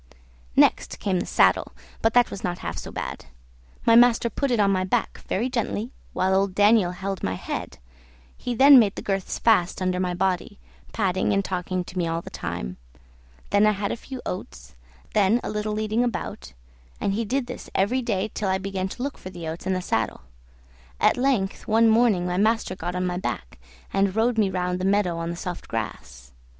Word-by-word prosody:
Next - - +3
came 190 -3 0
the - - -4
saddle, - - +3 0.3
but 225 +1 +2
that 245 -1 +5
was 195 - -7
not 175 0 -2
half - - -3
so - - -7
bad; - - -5 0.6
my 230 - +6
master 235 -1 +5
put 280 +4 -1
it 240 -3 +1
on 200 -1 +4
my 185 -1 +1
back 185 - -1
very 225 +6 0
gently, 235 -1 -2 0.2
while 190 +1 +1
old 190 -1 +1
Daniel 205 -2 +5
held 190 0 -4
my 95 - -1
head; 65 -7 -5 0.6
he 245 -1 -4
then 275 +2 +9
made 205 -4 +2
the - - -6
girths 195 -2 -2
fast 195 -6 +3
under 185 -1 0
my 180 -1 -1
body, 190 +2 -1 0.3
patting 190 -1 0
and 195 0 +1
talking 185 0 -2
to 180 +1 -6
me 170 - 0
all 165 +1 -2
the - - -9
time; - - -5 0.7
then 205 +1 +5
I 215 - +4
had 200 0 -2
a - - -1
few 260 +2 -9
oats, 180 - -7 0.4
then 210 +3 +4
a - - -3
little 210 0 -2
leading 215 +2 0
about; 195 - -4 0.5
and - - 0
this - - -2
he 230 - 0
did 245 +3 -3
every 235 +7 +2
day 215 -3 -1
till 200 - -2
I 190 - +2
began 190 -1 -3
to 245 - -6
look 280 0 -4
for 185 - -8
the 175 -3 -7
oats 165 +3 -5
and 190 - +1
the 185 - -3
saddle. 115 - -1 0.8
At - - +4
length, 245 -7 0
one 225 +1 +4
morning, 220 -5 +4
my 180 0 -1
master 215 -2 +1
got 175 0 -4
on 180 0 -1
my 180 0 -1
back 65 - -5 0.3
and 195 0 +1
rode 225 +1 +2
me 205 -3 +3
round 180 -1 -1
the - - -4
meadow 195 -3 +2
on 165 0 -3
the 170 - -3
soft 175 0 -6
grass. 65 - -6
195 Hz, 205 wpm, -24 LUFS, 180-225 Hz, 0.8 s, then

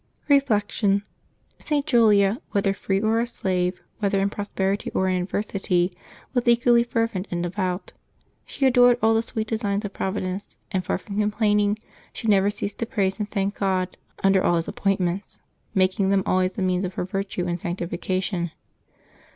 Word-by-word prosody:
Reflection. 210 -7 +2 0.3
— - - -41
St. 290 -2 +1
Julia, 220 -4 +4
whether 200 -1 +2
free 195 0 -1
or 220 +2 +2
a 235 - 0
slave, 180 -5 -1 0.2
whether 200 -2 +1
in 200 +1 +1
prosperity 200 -1 -2
or 190 - +2
in 185 -1 +1
adversity, 185 -2 -1 0.4
was 245 -1 0
equally 235 0 +5
fervent 230 -5 -1
and 175 0 -2
de 175 - -2
vout. 185 -1 -3 0.5
She 275 - -2
adored 245 -1 +6
all 225 0 +5
the 225 - +3
sweet 220 -1 -3
designs 210 -2 -1
of 200 - -5
Providence; 190 0 -3
and 185 -1 0
far - - -1
from 200 +2 -5
complaining, 210 -1 +2 0.4
she 225 - -5
never 200 -1 +4
ceased 205 0 -4
to 230 - -2
praise 195 -2 0
and 210 -1 -2
thank 200 -1 -1
God 185 -2 0 0.3
under 195 -1 +4
all 175 - +3
His 165 -1 0
holy - - -6
appointments, 190 -1 -1 0.4
making 190 +1 +2
them 195 -1 +3
always 185 0 +1
the 195 - -2
means 185 0 +1
of 185 -1 -4
her - - -2
virtue 195 -1 -3
and 175 -1 -2
sanctification. 180 +1 -2
200 Hz, 175 wpm, -24 LUFS, 185-215 Hz, 0.5 s, adored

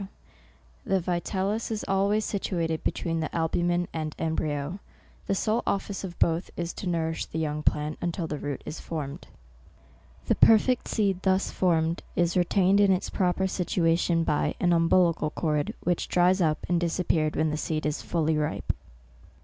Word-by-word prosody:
The 195 0 +1
vi 175 0 -1
tellus 200 +5 -2
is 220 -2 -3
always 200 +2 +2
situated 170 -5 -2
between 165 -2 -1
the 160 - -2
albumen 175 +1 +1
and 155 -1 -4
embryo. 160 +1 -2 0.5
The 195 - +1
sole 220 +4 +1
office 200 0 -2
of 175 -3 -6
both 165 +2 +1
is 170 -1 -3
to 195 - -6
nourish 160 -1 -1
the - - -6
young 150 -1 -1
plant, 150 0 0
until 175 0 -2
the 150 -2 -4
root 145 -2 -4
is 155 - -6
formed." 145 -4 -6 1.0
The - - +3
perfect 230 +3 +4
seed 195 -4 0
thus 190 0 +1
formed, 165 -2 +1
is 175 -1 +1
retained 190 +2 +3
in 200 -1 +5
its 185 0 0
proper 185 0 +1
situation 170 -2 +1
by 150 - 0
an 175 -1 +3
umbilical 165 -1 +3
cord, 150 -2 -1
which 175 0 0
dries 180 +2 +3
up 155 -2 +1
and 175 0 +2
disappears 165 -2 +1
when 155 -1 +1
the - - -1
seed 155 -1 -2
is 150 -1 -1
fully 160 -2 0
ripe. 150 - -1
170 Hz, 165 wpm, -27 LUFS, 160-190 Hz, 1.0 s, in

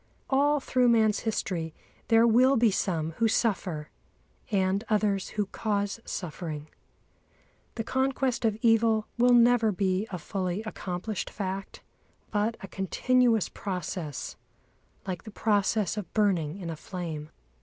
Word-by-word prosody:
All 290 +2 +3
through 255 -2 +2
man's 220 -3 +4
history 175 -7 -2 0.3
there 225 0 +5
will 250 +4 +5
be 230 -2 +4
some 165 -4 -1
who 230 - +5
suffer, 185 -9 -1 0.6
and 195 0 +1
others 210 -3 +1
who 210 - +2
cause 205 +1 -2
suffering. 155 -3 -5 1.1
The 225 - -2
conquest 265 0 0
of 220 -2 +1
evil 225 -1 +4
will 245 0 +6
never 235 -2 +5
be 190 +1 0
a 185 - -4
fully 185 +3 -3
accomplished 200 -1 -4
fact, 195 -1 -5 0.5
but 215 +2 0
a 195 - -7
continuous 230 +4 +2
process 180 -7 -5 0.7
like 185 -3 -4
the - - -9
process 210 -1 +1
of 195 -5 -5
burning 185 -7 +1
in 175 -4 -5
a - - -4
flame. 160 -3 -6
205 Hz, 130 wpm, -28 LUFS, 185-225 Hz, 1.1 s, will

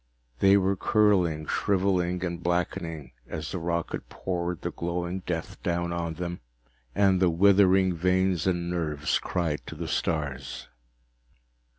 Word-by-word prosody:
They 100 +1 +6
were 95 0 +2
curling, 90 -7 +2
shriveling 90 -2 +1
and 85 -1 -4
blackening 80 -5 -2 0.2
as 80 -1 -5
the 90 - -3
rocket 85 0 -3
poured 90 -2 -3
the - - -3
glowing 85 +2 -3
death 85 -2 -4
down 85 0 -1
on 85 -1 -3
them, 85 +1 -4 0.6
and 95 -2 +3
the 90 - +5
withering 95 +1 +5
veins 90 0 +1
and 85 -2 0
nerves 75 -4 -1
cried 85 -5 -2
to - - -7
the - - -5
stars. 70 -6 -3
85 Hz, 130 wpm, -27 LUFS, 85-95 Hz, 0.6 s, They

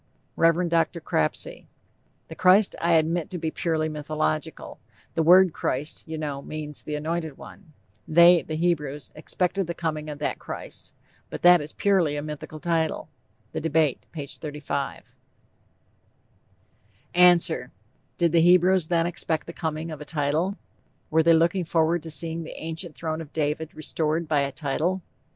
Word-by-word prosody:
REV. 165 +2 +3
DR. 165 0 +1
CRAPSEY: 80 - -2 0.6
The - - -9
Christ 190 +4 +4
I 170 0 +2
admit 165 +1 +1
to 180 - -5
be 160 -1 -3
purely 160 -3 -1
mythological....the 155 +1 -4
word 180 +1 +6
Christ, 145 +5 -2
you 160 0 -5
know, 145 -3 -4
means 150 0 -6
the 150 - -5
anointed 160 -1 -3
one....they 170 0 +2
(the 155 - -5
Hebrews) 150 -4 -1
expected 180 +4 -2
the 170 - -4
coming 155 -2 -3
of 150 - -6
that 150 - -3
Christ....But - - -10
that 175 -1 +7
is 150 +1 -8
purely 185 -7 +2
a 145 - -3
mythical 155 0 -7
title. 165 -1 -1 0.4
(The - - -4
Debate 155 -3 +1
P. 150 -4 -6
35.) 145 -1 -5 2.0
ANSWER: 175 -6 +4 0.5
Did 170 -2 +2
the 165 0 +4
Hebrews 180 0 +4
then 170 -1 +2
expect 165 -2 -2
the 170 - -8
coming 160 0 -4
of 155 -1 -8
a - - -4
title? 155 +6 -1 0.5
Were 160 +1 +4
they 165 +1 +5
looking 170 +3 +2
forward 165 0 +1
to 165 - -8
seeing 165 +2 0
the 160 - -8
ancient 165 +1 -6
throne 160 -1 -3
of 155 -2 -10
David 155 +1 -2
restored 155 +1 -2
by 150 -2 +2
a 140 0 0
_title? 155 +6 -1
160 Hz, 150 wpm, -25 LUFS, 150-170 Hz, 2.0 s, that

